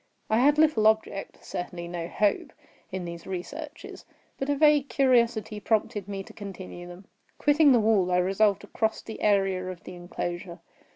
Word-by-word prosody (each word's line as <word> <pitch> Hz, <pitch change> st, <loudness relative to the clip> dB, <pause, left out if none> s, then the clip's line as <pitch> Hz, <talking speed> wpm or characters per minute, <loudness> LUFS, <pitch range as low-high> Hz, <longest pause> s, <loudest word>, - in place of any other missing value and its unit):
I 220 Hz, -, +4 dB
had 290 Hz, +4 st, +4 dB
little 300 Hz, -9 st, +4 dB
object—certainly 190 Hz, -4 st, -2 dB
no 170 Hz, -1 st, -4 dB
hope—in 190 Hz, -2 st, -3 dB
these 170 Hz, -1 st, -8 dB
researches; 295 Hz, -, -7 dB, 0.4 s
but 270 Hz, -, -2 dB
a 285 Hz, -, +2 dB
vague 295 Hz, -2 st, +4 dB
curiosity 235 Hz, -4 st, +2 dB
prompted 210 Hz, -2 st, -1 dB
me 195 Hz, -1 st, -5 dB
to -, -, -14 dB
continue 185 Hz, -3 st, -8 dB
them. 175 Hz, +2 st, -11 dB, 0.3 s
Quitting 295 Hz, 0 st, +5 dB
the 245 Hz, -, +5 dB
wall, 210 Hz, -4 st, +2 dB
I 180 Hz, -, +3 dB
resolved 195 Hz, +3 st, +2 dB
to 205 Hz, -, -12 dB
cross 220 Hz, -1 st, -1 dB
the 220 Hz, -, -8 dB
area 195 Hz, -3 st, +2 dB
of 180 Hz, -2 st, -8 dB
the -, -, -9 dB
enclosure. 175 Hz, 0 st, -5 dB
205 Hz, 160 wpm, -27 LUFS, 180-240 Hz, 0.4 s, Quitting